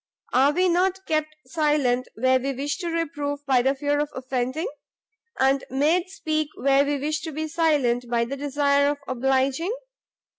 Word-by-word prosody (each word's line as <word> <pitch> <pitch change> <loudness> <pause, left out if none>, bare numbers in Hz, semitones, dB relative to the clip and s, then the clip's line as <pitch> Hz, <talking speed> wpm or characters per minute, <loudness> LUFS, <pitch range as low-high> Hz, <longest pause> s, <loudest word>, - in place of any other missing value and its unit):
are 270 +3 +5
we 365 +5 +2
not 370 +2 +1
kept 310 -1 -1
silent 260 -3 +1
where 260 +3 +3
we 275 +2 -2
wish 280 +5 -3
to 350 - -4
reprove 290 -3 -3
by 260 -2 +3
the 265 +2 +1
fear 290 +1 0
of 295 0 -1
offending? 260 +4 -2 0.7
and 270 +1 +3
made 315 +7 +1
speak 310 -6 -2
where 275 0 +3
we 290 0 -1
wish 305 +3 -2
to 320 - -5
be 310 +1 -3
silent 295 -7 +1
by 235 -1 +1
the 270 +4 -4
desire 285 0 +2
of 290 - -1
obliging? 265 - 0
285 Hz, 170 wpm, -24 LUFS, 265-310 Hz, 0.7 s, are